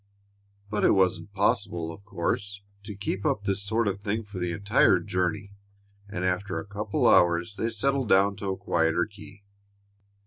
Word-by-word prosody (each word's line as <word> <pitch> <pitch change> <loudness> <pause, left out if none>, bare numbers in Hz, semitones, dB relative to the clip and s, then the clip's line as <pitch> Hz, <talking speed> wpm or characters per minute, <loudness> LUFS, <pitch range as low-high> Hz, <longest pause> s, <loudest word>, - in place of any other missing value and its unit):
But 105 - -1
it - - +5
wasn't 95 -1 +1
possible, 95 -4 0
of 90 - -14
course, 100 +2 -3 0.2
to 105 -1 -7
keep 100 0 -3
up 100 - 0
this 100 -1 -1
sort 110 +2 0
of 100 0 -1
thing 105 +2 -2
for 105 -2 -8
the 90 -1 -1
entire 100 +4 +3
journey, 90 +3 -2 0.6
and 90 -3 -3
after 95 +2 -1
a - - -4
couple 100 0 -2
of - - +7
hours 85 +2 +3
they 115 - -1
settled 130 +2 0
down 100 +1 +4
to 100 -1 -4
a 95 - -2
quieter 80 +1 +1
key. 100 -1 -14
100 Hz, 175 wpm, -27 LUFS, 90-105 Hz, 0.6 s, of